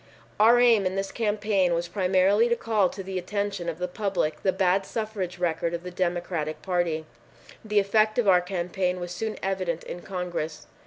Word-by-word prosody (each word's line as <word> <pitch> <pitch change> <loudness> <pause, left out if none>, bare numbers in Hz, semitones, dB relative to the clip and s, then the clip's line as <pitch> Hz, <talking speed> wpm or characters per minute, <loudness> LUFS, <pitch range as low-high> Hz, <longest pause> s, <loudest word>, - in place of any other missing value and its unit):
Our 230 +3 +6
aim 230 -5 +5
in 185 - -3
this 195 0 -2
campaign 205 -5 +1
was 170 +1 -2
primarily 195 +4 +3
to 235 - +3
call 215 -6 +1
to 195 - -7
the 190 0 -3
attention 200 -2 -3
of 165 - -5
the 180 +1 -2
public 180 -5 -2
the 190 - +2
bad 190 0 +2
suffrage 210 -5 -4
record 170 -1 -1
of 170 - -6
the 180 - -6
Democratic 175 -3 -2
Party. 175 -4 0 0.6
The 210 -1 -2
effect 215 +2 +3
of 240 -4 +2
our 180 -2 +6
campaign 180 0 -2
was 175 0 -5
soon 215 +4 -4
evident 185 -4 -2
in 175 - -7
Congress. 170 -5 -4
185 Hz, 180 wpm, -26 LUFS, 175-205 Hz, 0.6 s, Our